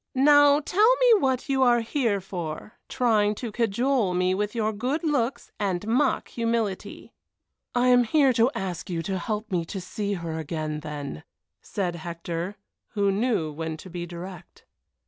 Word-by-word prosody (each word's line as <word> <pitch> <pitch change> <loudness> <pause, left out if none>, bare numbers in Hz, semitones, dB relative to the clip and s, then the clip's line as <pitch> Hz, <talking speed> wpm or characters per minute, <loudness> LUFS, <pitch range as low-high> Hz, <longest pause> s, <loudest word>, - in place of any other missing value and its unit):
Now 290 +2 +6
tell 425 +10 +4
me - - +5
what 260 -5 0
you 270 -1 +1
are 240 -2 +5
here 230 -3 0
for, 175 +1 -6 0.2
trying 215 -4 +2
to 235 +1 -5
cajole 230 -2 +1
me 180 +1 +2
with 210 +3 -2
your 220 -1 0
good 255 - -2
looks 265 -5 -1
and 195 -2 -1
mock 255 +4 +1
humility." 230 -4 -3 0.6
"I 245 +1 +3
am 245 -1 +5
here 275 +2 +4
to 230 +1 +4
ask 185 -3 -4
you 165 -2 -2
to 190 0 -2
help 215 +3 -4
me 175 -2 +1
to 190 - -5
see 200 +3 -3
her 165 -3 -4
again, 155 -1 -3
then," 145 - -6 0.4
said 180 -4 -3
Hector, 170 +3 -5 0.4
who 200 -2 +2
knew 205 -6 0
when 160 +1 -4
to 185 +3 -11
be 175 0 -5
direct. 175 +1 -10
210 Hz, 165 wpm, -26 LUFS, 175-250 Hz, 0.6 s, Now